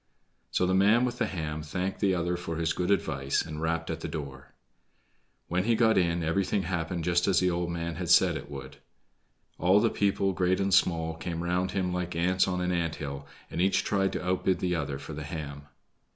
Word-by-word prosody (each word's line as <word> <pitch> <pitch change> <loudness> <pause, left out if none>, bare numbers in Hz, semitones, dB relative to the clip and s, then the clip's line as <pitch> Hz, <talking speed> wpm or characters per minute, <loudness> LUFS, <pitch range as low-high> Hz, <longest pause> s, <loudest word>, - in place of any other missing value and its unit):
So 90 - +1
the 95 - +1
man 105 +6 +4
with 125 0 -3
the - - +1
ham 80 -4 -4
thanked 90 +5 -3
the 95 -3 +2
other 85 0 0
for 85 -1 -5
his 80 0 0
good 90 +1 -2
advice 70 -8 +1
and 80 -1 -6
rapped 80 0 -1
at 80 - -4
the 85 - -5
door. 70 -4 -7 0.9
When 90 +2 0
he 115 0 +3
got 110 -1 +4
in, 85 -2 +2
everything 95 +4 0
happened 85 -1 -2
just 85 +2 +2
as 95 - +4
the 90 -1 +2
old 85 0 -1
man 85 -1 -3
had - - -4
said - - +5
it 70 - -7
would: 70 -2 -8 0.8
all 95 +4 +5
the 115 +1 +2
people, 100 -1 +1
great 90 0 +1
and 100 0 +1
small, 80 -3 +3
came 85 0 -4
round 90 +1 0
him 90 -2 -1
like 90 -1 -3
ants 90 +2 +2
on 90 -1 -1
an 90 0 0
ant 85 -2 -1
hill, 70 -1 -6 0.2
and 85 - -1
each 95 +1 +2
tried 95 -1 +1
to - - -4
outbid 95 0 +1
the 90 -1 -1
other 70 -5 -2
for 80 - -8
the 75 - -6
ham. 75 -2 -6
90 Hz, 215 wpm, -28 LUFS, 80-95 Hz, 0.9 s, said